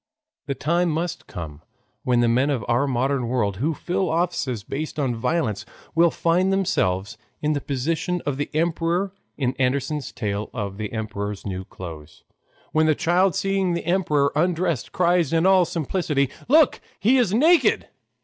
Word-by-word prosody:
The 140 - -2
time 170 +4 +1
must 170 +2 -3
come 80 -3 -7 0.4
when 125 -3 +2
the 120 - +3
men 125 +5 +2
of 135 -5 -1
our 120 +4 +2
modern 130 0 0
world 105 -6 0
who 150 +8 0
fill 185 +3 -1
offices 160 - -1
based 150 +8 -5
upon 135 -5 0
violence 115 - -1 0.3
will 170 +1 +5
find 175 +4 +1
themselves 105 - 0 0.2
in 150 0 0
the 145 - -2
position 160 +7 -1
of 140 -2 -1
the 145 - -2
emperor 170 +4 0 0.2
in 130 -3 0
Andersen's 135 +2 -1
tale 105 -1 -3
of 100 -4 -4
"The 105 -1 -4
Emperor's 105 -2 -4
New 95 -2 -4
Clothes," 80 -5 -10 0.5
when 155 0 +3
the 155 - +4
child 175 +2 +2
seeing 195 -2 0
the 170 - -4
emperor 155 -6 +2
undressed, 170 -2 0
cried 175 -4 +2
in 165 +1 +2
all 190 -2 +5
simplicity, 150 -4 -1 0.2
"Look, 300 +3 +4 0.2
he 245 +6 +4
is 230 -7 +2
naked!" 320 - +4
150 Hz, 160 wpm, -23 LUFS, 120-175 Hz, 0.5 s, will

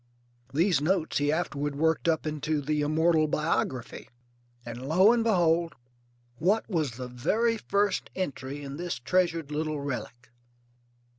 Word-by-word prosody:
These 165 +2 +2
notes 165 0 +1
he 145 0 +2
afterward 145 -3 -2
worked 160 +3 +1
up 160 -1 +1
into 155 0 -1
the 150 +1 -1
immortal 155 +1 +3
Biography. 150 -5 -2 0.6
And 120 +3 -6
lo 190 +8 +6
and 235 -1 +1
behold, 170 -6 +2 0.6
what 200 - +1
was 155 - -1
the 125 +2 -6
very 220 - 0
first 205 -1 0
entry 145 -5 -4
in 140 0 -6
this 175 +1 -3
treasured 165 +3 0
little 155 0 -2
relic? 130 -3 -6
155 Hz, 135 wpm, -28 LUFS, 140-175 Hz, 0.6 s, lo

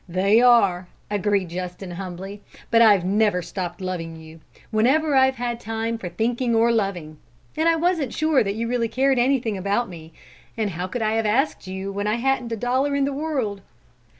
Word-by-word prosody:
"They 195 +6 +3
are," 200 -8 +4 0.2
agreed 205 -3 0
Justin 180 +1 -6
humbly, 190 +2 -7 0.3
"but 230 0 +5
I've 205 -6 +5
never 205 -2 +2
stopped 180 +1 -5
loving 170 -3 -4
you, 160 0 -13 0.3
whenever 275 +8 +2
I've 265 0 +4
had 240 -1 -3
time 225 +1 -3
for 180 - -5
thinking 235 +5 -1
or 230 +1 +4
loving. 180 -9 -2 0.4
And 320 +1 +2
I 330 - +3
wasn't 325 -6 0
sure 310 -4 +2
that 200 -1 -3
you 230 +1 -2
really 235 -1 0
cared 265 +2 +2
anything 240 -5 +1
about 200 +5 -1
me; 165 -2 -11 0.5
and 215 -3 -1
how 180 +2 -4
could 225 +4 -3
I 215 - +1
have 225 -1 0
asked 245 -1 0
you 190 +1 -5
when 205 +1 -3
I 210 - +1
hadn't 250 -1 -1
a 230 - -2
dollar 260 +5 0
in 280 -1 +2
the 280 - -2
world?" 270 -9 -2
220 Hz, 190 wpm, -23 LUFS, 190-245 Hz, 0.5 s, but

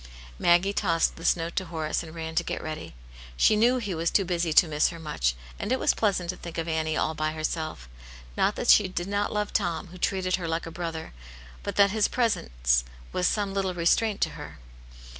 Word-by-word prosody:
" - - -18
Maggie 175 +4 +4
tossed 165 -5 +1
this 165 - +2
note 165 0 -4
to 185 - 0
Horace, 160 -2 -2
and 165 -1 -10
ran 160 -1 -5
to - - +1
get - - -4
ready. 155 - -6 0.4
She 215 - +5
knew 240 +4 +4
he 205 -6 -3
was 165 0 0
too 195 - +2
busy 170 -2 0
to 165 - +6
miss 150 -1 +2
her 170 - -8
much, 150 - -1 0.2
and - - -3
it 260 - +3
was - - +3
pleasant 190 -5 0
to 185 - -11
think 170 -1 -8
of 165 - -1
seeing 165 -1 -1
Annie 160 0 -1
all 160 - 0
by 155 0 -1
herself. 155 - -4 0.5
Not - - +2
that - - -2
she 205 - +7
did 175 -1 -4
not 205 +1 -1
love 210 0 -2
Tom, 175 -3 -1
who 180 +1 -12
treated 185 0 0
her 175 -3 -4
like 165 +1 -2
a 165 - -7
brother, 165 -2 -5 0.5
but - - -5
that 200 -1 +5
his 215 0 +2
presence - - +1 0.3
was 180 - +1
some 205 -2 0
little 190 -2 -1
restraint 200 +5 +2
to - - +3
her. - - -9
170 Hz, 225 wpm, -27 LUFS, 160-195 Hz, 0.5 s, she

